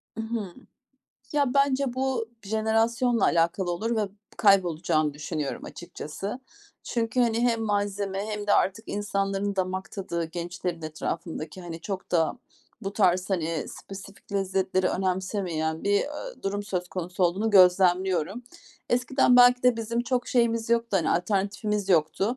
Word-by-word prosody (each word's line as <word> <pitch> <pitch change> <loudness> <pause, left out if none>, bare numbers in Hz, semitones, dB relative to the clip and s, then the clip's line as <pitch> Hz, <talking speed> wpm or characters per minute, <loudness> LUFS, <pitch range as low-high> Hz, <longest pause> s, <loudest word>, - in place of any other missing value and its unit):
I 225 - -3
hı. 220 -5 -4 0.8
Ya, 285 -4 +1
bence 275 -2 +2
bu 260 -3 -1
jenerasyonla 225 +2 +1
alakalı 170 +2 +2
olur 220 +7 -1
ve 210 -2 0 0.3
kaybolacağını 170 -7 +3
düşünüyorum 150 -1 -4
açıkçası. 175 - -7 0.4
Çünkü, 235 +1 -1
hani, 230 -1 +2
hem 235 -2 +2
malzeme 205 -1 -1
hem 210 -1 -4
de 205 - +3
artık 205 +3 +1
insanların 200 -1 -1
damak 185 0 -2
tadı, 170 -4 -3
gençlerin 170 +1 -5
etrafındaki, 155 +2 -5
hani, 170 -2 -7
çok 190 +1 -5
da 165 +7 +2 0.4
bu 195 0 -3
tarz 185 -2 +2
hani 165 -4 -1
spesifik 195 +1 -11
lezzetleri 190 -1 0
önemsemeyen 185 -4 -2
bir, 200 - +1
eee, 300 +13 -6
durum 200 +1 -2
söz 180 -4 -3
konusu 180 +1 -2
olduğunu 195 +6 +1
gözlemliyorum. 185 +1 +4 0.5
Eskiden 250 +1 +3
belki 245 0 +7
de 250 -2 +4
bizim 230 +1 -2
çok 245 +1 -1
şeyimiz 230 -2 +1
yoktu, 230 -3 +2
hani 165 -4 +1
alternatifimiz 200 +2 0
yoktu. 185 +7 +2
195 Hz, 135 wpm, -26 LUFS, 180-225 Hz, 0.8 s, belki